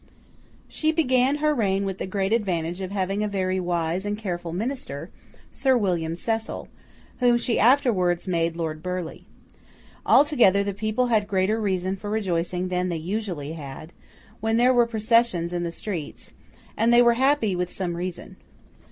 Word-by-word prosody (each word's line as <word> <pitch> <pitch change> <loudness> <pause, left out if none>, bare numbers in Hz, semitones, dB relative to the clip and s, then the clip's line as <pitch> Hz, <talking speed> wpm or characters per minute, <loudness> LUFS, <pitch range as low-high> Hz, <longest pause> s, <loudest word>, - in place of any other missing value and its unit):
She 315 0 0
began 265 -4 +2
her 300 0 +1
reign 200 -6 0
with 195 -1 -4
the - - -3
great 195 +2 -1
advantage 175 -5 -1
of 185 - -4
having 195 +1 -1
a - - 0
very 190 -2 -1
wise 175 0 -1
and 205 0 -2
careful 175 -5 -4
Minister, 250 +10 -4 0.4
Sir 265 -2 +2
William 170 -6 -1
Cecil, 225 +5 -3 0.5
whom 245 -1 +4
she 240 0 0
afterwards 215 -9 +3
made 165 -2 0
Lord 160 -2 -4
Burleigh. 180 -1 -5 0.8
Altogether, 240 -10 +4
the 200 0 -3
people 215 +5 -1
had 215 -3 +2
greater 205 +3 +1
reason 190 -1 -1
for 205 +2 -7
rejoicing 180 -3 -1
than 180 0 -1
they 170 - -2
usually 175 -4 -4
had, 155 +1 -9 0.5
when 225 +1 0
there 250 +2 +5
were 240 -1 +4
processions 220 -6 +1
in 175 - -1
the 170 -1 -2
streets; 170 -3 -6 0.4
and 230 +1 +2
they 240 0 +7
were 235 0 +5
happy 255 -5 +2
with 180 0 -2
some 180 -3 -3
reason. 180 0 -6
195 Hz, 160 wpm, -24 LUFS, 175-230 Hz, 0.8 s, they